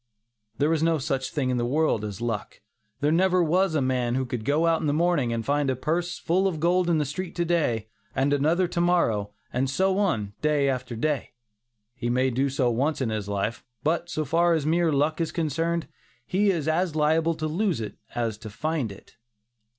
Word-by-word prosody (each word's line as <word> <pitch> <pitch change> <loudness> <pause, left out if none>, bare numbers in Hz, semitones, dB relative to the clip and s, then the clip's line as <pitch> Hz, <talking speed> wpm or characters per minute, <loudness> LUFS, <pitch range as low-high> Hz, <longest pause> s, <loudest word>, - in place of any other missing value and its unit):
There 150 +3 +2
is 160 - 0
no 165 0 +3
such 135 -1 -2
thing 130 -4 -1
in 125 - 0
the 120 - 0
world 145 -5 +1
as 105 -1 -5
luck. 115 -4 -4 0.4
There 150 +1 +2
never 180 +1 +3
was 180 +1 +2
a 145 - +2
man 125 -2 0
who 130 0 0
could 120 -2 -4
go 150 +4 +2
out 165 -1 +2
in - - -1
the 145 - +2
morning 160 -7 +2
and 115 -1 -2
find 145 -1 +1
a 130 - +1
purse 170 +7 -1
full 185 +3 +1
of 170 -5 -2
gold 175 +2 +2
in 165 - +3
the 150 - +1
street 165 +6 -5
to 175 - 0
day, 135 -11 0 0.3
and 140 +2 +2
another 160 +6 +2
to 170 0 -1
morrow, 115 -13 +1 0.2
and 130 +2 0
so 190 +7 +1
on, 110 - 0
day 150 -2 +2
after 130 -2 -2
day. 145 +3 -1 0.6
He 120 -1 -3
may 130 +2 +2
do 135 +3 +1
so 130 -2 +1
once 140 +7 0
in 130 -4 0
his 105 -2 -3
life; 100 +3 -2 0.2
but 170 +3 0
so 155 -2 -2
far 170 +4 +3
as 155 -3 -1
mere 165 +1 +2
luck 150 +3 +1
is 165 - -1
concerned, 165 +1 -1 0.4
he 200 +7 +2
is 165 -6 0
as 165 +1 +1
liable 160 +2 +2
to 155 - -4
lose 170 - 0
it 110 - -5 0.2
as 115 -3 -2
to 110 -1 -8
find 145 +1 -2
it. 100 +3 -15
150 Hz, 215 wpm, -26 LUFS, 125-170 Hz, 0.6 s, no